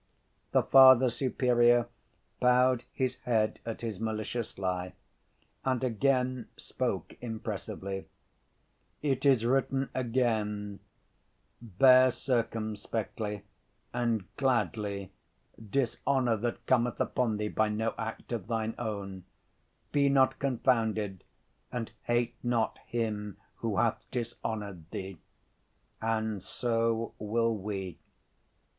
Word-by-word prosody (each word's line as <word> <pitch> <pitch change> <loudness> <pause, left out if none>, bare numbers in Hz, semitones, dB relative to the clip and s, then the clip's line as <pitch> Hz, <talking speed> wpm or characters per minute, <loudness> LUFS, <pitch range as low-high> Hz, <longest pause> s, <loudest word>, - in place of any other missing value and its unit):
The - - +4
Father 130 -2 +8
Superior 120 -2 +3 0.5
bowed 125 0 +4
his 130 -1 -1
head 110 -3 0
at 115 - -4
his 110 -5 -4
malicious 110 +1 -3
lie, 90 -1 -2 0.7
and 130 -1 0
again 130 0 +1
spoke - - -3
impressively: 100 -4 -5 1.0
"It 140 -1 +1
is 130 -5 +4
written 135 +1 +1
again, 110 -5 -1 0.8
'Bear 130 +4 +6
circumspectly 110 -4 -2 0.5
and 120 -4 0
gladly 105 -7 0 0.6
dishonor 130 0 +1
that 120 +2 -3
cometh 120 -3 +2
upon 115 -4 0
thee 105 0 -2
by 110 0 +1
no 110 +1 -1
act 110 +2 -6
of 115 -6 -3
thine 115 -1 -1
own, 100 -5 -5 0.7
be 140 -1 +3
not 135 -1 +3
confounded 110 -7 0 0.5
and 120 -3 -4
hate 120 0 +1
not 120 -2 0
him 105 -4 -2 0.2
who - - -2
hath - - 0
dishonored 105 -7 -4
thee.' 95 -3 -6 0.8
And 110 -2 -1
so 115 0 -1
will 115 +2 +1
we." 95 -4 -5
115 Hz, 100 wpm, -30 LUFS, 105-125 Hz, 1.0 s, Father